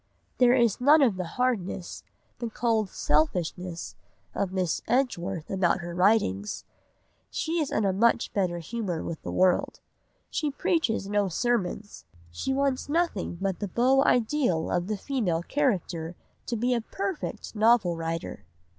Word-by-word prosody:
There 250 0 +6
is 235 -3 +2
none 290 +3 +6
of 230 -7 +3
the 185 - -3
hardness, 205 -8 -1 0.4
the 235 -1 -3
cold 220 -3 0
selfishness, 170 +3 -1 0.4
of 190 - -1
Miss 185 -3 -1
Edgeworth 195 - -1
about 190 -1 +1
her 175 0 -6
writings; 180 - +1 0.6
she 330 +1 -1
is 300 - -1
in 215 - +1
a 195 - +2
much 230 +4 +2
better 180 -4 0
humour 180 -1 -3
with 165 - -5
the - - -5
world; 185 -1 +2 0.5
she 305 - 0
preaches 275 - 0
no 205 0 +1
sermons; 205 0 -2 0.3
she 175 - -3
wants 275 0 0
nothing 310 - 0
but 195 -2 -2
the 205 - -2
beau 260 +7 +3
ideal 235 - +1
of 175 0 0
the 215 0 -2
female 195 -10 -1
character 180 - -1 0.3
to 235 - -1
be 245 +3 +1
a 235 - 0
perfect 385 - -5
novel 215 -5 +4
writer!" 165 0 -4
205 Hz, 145 wpm, -27 LUFS, 175-250 Hz, 0.6 s, There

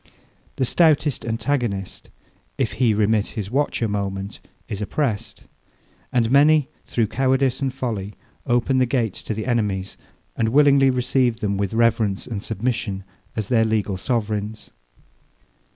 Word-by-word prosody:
The 130 - 0
stoutest 150 -2 +3
antagonist, 115 -5 -2 0.5
if - - 0
he 120 0 +2
remit 105 0 +2
his 105 -1 -4
watch 140 -2 0
a - - +2
moment, 100 -1 -3 0.3
is 100 - -5
oppressed. 110 0 -2 0.7
And 120 -3 +1
many, 145 +1 +5 0.2
through 115 - +1
cowardice 130 +3 +1
and 135 -1 0
folly, 110 -6 -4 0.3
open 125 +2 +2
the 130 - +3
gates 115 -6 -1
to 110 - -4
the 110 - -4
enemies, 105 -6 -1 0.4
and 110 - +1
willingly 140 +1 +5
receive 125 -2 +1
them 100 -3 -1
with 100 +1 -2
reverence 115 -4 +2
and 110 -5 -5
submission, 110 -3 -2 0.3
as 110 -3 -3
their 115 -3 +4
legal 110 -3 0
sovereigns. 105 0 -3
115 Hz, 135 wpm, -22 LUFS, 105-130 Hz, 0.7 s, many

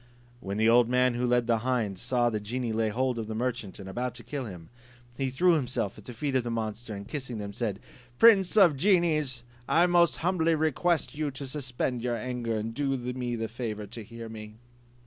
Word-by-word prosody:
When 100 -2 -4
the 110 +1 +3
old 120 0 +5
man 125 0 +3
who 125 +1 0
led 120 0 +3
the 115 -1 +2
hind 115 -6 -1
saw 120 0 +1
the 110 - -1
genie 115 +2 -3
lay 110 0 +1
hold 125 +2 0
of 110 - -4
the 110 - -4
merchant, 120 -4 -3
and 100 - -9
about 125 +5 -3
to - - -9
kill 140 -3 -4
him, 90 -6 -9 0.5
he 135 0 -1
threw 175 +7 +3
himself 125 - -1
at 105 - -14
the 125 - -8
feet 140 +4 -2
of 130 -2 +2
the 120 - -3
monster, 110 -1 -4
and 100 0 -8
kissing 130 -6 -5
them, 100 -1 -5
said 105 -3 -2
to 100 - -18
him, - - -25 0.3
"Prince 210 -4 +6
of 180 -8 +7
genies, 155 - +2 0.3
I 170 +2 +5
most 175 -1 +4
humbly 165 -2 +2
request 160 +2 +1
you 150 0 -2
to 140 +1 -7
suspend 130 -3 -2
your 120 -1 -1
anger, 120 -1 -2
and 110 +1 -3
do 135 +1 0
me 125 -1 -3
the 115 -1 -2
favour 110 -2 -5
to 115 +2 -9
hear 115 +2 -9
me. 110 -1 -9
120 Hz, 225 wpm, -28 LUFS, 110-135 Hz, 0.5 s, of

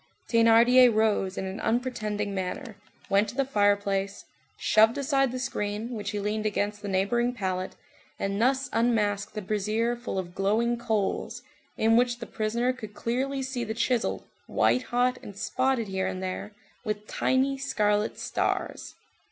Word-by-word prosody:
Thénardier 235 +2 +6
rose 215 -3 +1
in - - -2
an 190 +2 -5
unpretending 215 -4 -1
manner, 195 +5 -4 0.3
went 200 +2 +2
to - - -9
the 275 0 +1
fireplace, 200 -4 +1 0.3
shoved 220 +4 +4
aside 270 -2 +1
the 255 - -4
screen, 220 -3 -3
which 210 -4 -4
he 210 - -3
leaned 210 +1 -1
against 205 0 -2
the 205 - -5
neighboring 235 +6 +1
pallet, 185 -4 -3 0.4
and 200 +2 -2
thus 265 +2 +2
unmasked 215 -3 +1
the 210 - -4
brazier 215 +4 0
full 240 -4 -5
of 175 -2 -4
glowing 220 +5 +1
coals, 220 -4 -2 0.3
in 225 +1 +4
which 240 0 +2
the 235 - -7
prisoner 235 +4 -1
could 215 -5 -9
plainly 265 +5 -1
see 260 -2 -3
the 220 -1 -4
chisel 235 +1 0 0.2
white 255 - +2
hot 250 +1 +1
and 200 - -10
spotted 235 +2 0
here 190 -1 -1
and 190 0 -4
there 185 +3 -4 0.3
with 210 -2 -3
tiny 265 +4 +1
scarlet 210 -5 0
stars. - - -2
220 Hz, 155 wpm, -27 LUFS, 205-245 Hz, 0.4 s, Thénardier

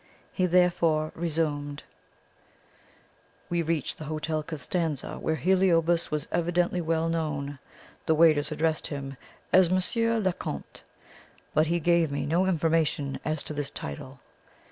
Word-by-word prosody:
He 185 -2 +1
therefore 170 -3 +2
resumed: 150 -3 -2 1.7
"We 170 0 +1
reached 165 -3 -2
the 155 - -6
Hotel 155 +1 -2
Costanza, 155 0 -3
where 160 - 0
Heliobas 175 -2 +2
was 150 0 -2
evidently 175 +1 +1
well 165 0 0
known. 145 -4 -2 0.5
The 160 - +4
waiters 155 -2 +4
addressed 155 +1 0
him 135 -2 -5 0.4
as 185 -2 +6
Monsieur 230 +5 +2
le 190 -4 +1
Comte; 70 - -7 0.7
but 155 +1 +3
he 170 +2 +1
gave 170 -2 +2
me 140 - -2
no 175 +5 +2
information 160 -5 +1
as 155 -1 -1
to - - -6
this 145 -1 -3
title. 70 -1 -7
160 Hz, 130 wpm, -27 LUFS, 150-175 Hz, 1.7 s, as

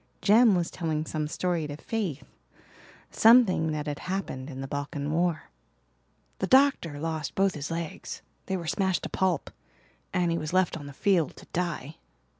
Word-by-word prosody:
Jem 215 0 +6
was 175 -2 -1
telling 160 -3 -2
some 155 -1 -2
story 170 0 -1
to 145 0 -6
Faith 170 - -3 0.9
something 220 -9 +5
that 150 -1 -3
had 145 -2 -4
happened 180 -8 -4
in 135 -2 -7
the 135 - -4
Balkan 145 +1 -3
War. 170 0 0 0.9
"The 190 - 0
doctor 260 - +4
lost 160 -2 -3
both 195 0 +2
his 150 -1 -5
legs 165 -1 -5 0.2
they 190 - -1
were 170 - -6
smashed 185 +2 0
to - - -4
pulp 185 -6 0 0.6
and 175 -2 +1
he 165 - 0
was 155 +1 -5
left 185 -2 +2
on 145 -3 -7
the - - -8
field 175 0 +1
to - - -13
die. 165 -4 -3
165 Hz, 170 wpm, -28 LUFS, 150-185 Hz, 0.9 s, Jem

